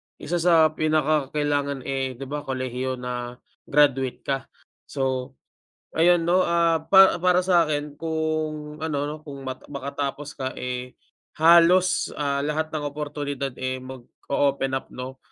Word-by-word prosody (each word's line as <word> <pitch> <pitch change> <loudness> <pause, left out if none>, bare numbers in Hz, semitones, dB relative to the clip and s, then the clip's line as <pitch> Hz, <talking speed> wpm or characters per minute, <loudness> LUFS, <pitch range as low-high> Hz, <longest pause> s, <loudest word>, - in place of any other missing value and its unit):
isa 175 +2 -3
sa 165 -2 +5
pinakakailangan, 145 -2 0
eh, 135 -1 -2
'di 130 - -8
ba, 145 0 -4
kolehiyo 130 0 -3
na, 125 -1 -5 0.3
graduate 135 -3 +2
ka. 135 -1 -2 0.4
So, 130 -1 -2 0.6
ayun 175 +1 +5
'no, 175 +3 +3
ah, 170 -2 +2
pa 190 -2 +7
para 180 +1 +3
sa'kin 155 -5 +1
kung, 155 -2 -3
ano 155 -2 -3
'no, 150 - -5
kung 140 -2 -8
ma 130 -1 -5
makatapos 140 +1 -5
ka, 130 -1 -3
eh, 125 0 -5 0.5
halos, 170 +3 +5
ah, 140 -1 -1
lahat 155 +1 -1
ng 155 -1 -4
oportunidad, 145 -1 -4
eh, 130 0 -3
mag-o-open 135 +1 -2
up, - - -11
'no. 130 +1 -7
145 Hz, 135 wpm, -24 LUFS, 130-160 Hz, 0.6 s, pa